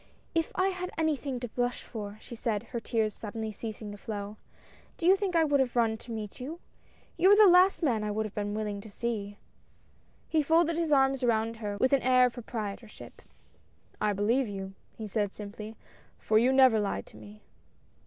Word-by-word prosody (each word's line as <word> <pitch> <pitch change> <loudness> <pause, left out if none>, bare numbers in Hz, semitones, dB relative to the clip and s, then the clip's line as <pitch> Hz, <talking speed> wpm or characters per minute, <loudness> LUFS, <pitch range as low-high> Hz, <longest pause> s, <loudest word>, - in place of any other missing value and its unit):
If 330 -1 0
I 375 +1 +2
had 365 -1 -4
anything 295 -5 -1
to 245 - -3
blush 245 +1 -2
for," 210 -2 -7
she 235 - -9
said, 220 -2 -2
her 240 0 -5
tears 220 -2 -1
suddenly 220 +1 -5
ceasing 215 0 -7
to 205 - -10
flow, 205 0 -6 0.3
" - - -27
do 335 - -4
you 375 +2 +7
think 390 -3 -2
I 330 - +5
would 290 -2 +2
have 255 -2 0
run 230 -2 +2
to 235 - -11
meet 215 -3 -6
you? 300 +7 -6 0.6
You 375 - +5
are - - +9
the 425 0 +8
last 365 0 +5
man 230 -8 +1
I 210 - -2
would 215 +1 -1
have 210 - -7
been 205 0 -3
willing 210 -2 -3
to 215 - -11
see." 205 -2 -4
^ - - -37 0.9
He 315 - +2
folded 330 +2 +3
his 330 -2 -1
arms 270 -1 +3
around 230 -2 +1
her 205 -2 -4
with 255 +6 +2
an 275 - +4
air 255 0 +5
of 245 - -1
pro 245 - -7
prietorship. 215 -1 -7 0.9
"I 210 - +2
believe 225 +6 +1
you," 195 -1 -6 0.2
he 220 - -5
said, 205 -1 -2
simply, 210 +1 -8 0.4
"for 215 0 +2
you 245 +3 +3
never 260 -4 +6
lied 200 - -2
to - - -16
me 105 0 -13
230 Hz, 210 wpm, -29 LUFS, 210-270 Hz, 0.9 s, are